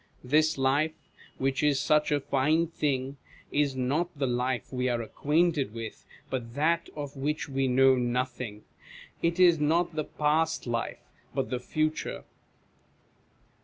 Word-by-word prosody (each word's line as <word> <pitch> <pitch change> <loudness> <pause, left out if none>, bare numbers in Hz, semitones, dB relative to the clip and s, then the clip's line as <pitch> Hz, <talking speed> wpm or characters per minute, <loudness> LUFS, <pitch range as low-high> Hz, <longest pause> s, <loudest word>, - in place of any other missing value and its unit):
This 155 +4 +3
life, 145 +4 +2 0.4
which 135 0 0
is 145 -2 +3
such 150 +1 +2
a 145 - +3
fine 150 +4 +2
thing, 140 -4 -2 0.3
is 145 -2 +1
not 140 +7 0
the 140 - 0
life 125 0 -1
we 125 0 0
are 120 -1 0
acquainted 150 +1 0
with, 115 -1 -7 0.2
but 120 -2 -4
that 165 +3 +1
of 145 -2 -6
which 150 +4 -2
we 135 -1 0
know 130 +1 +5
nothing; 125 -3 -2 0.6
it 170 +2 0
is 175 -3 +6
not 165 +3 +2
the 155 - 0
past 155 +2 0
life, 115 -2 -3 0.3
but 135 -1 -1
the 125 - -1
future. 155 +4 -2
140 Hz, 140 wpm, -28 LUFS, 130-155 Hz, 0.6 s, is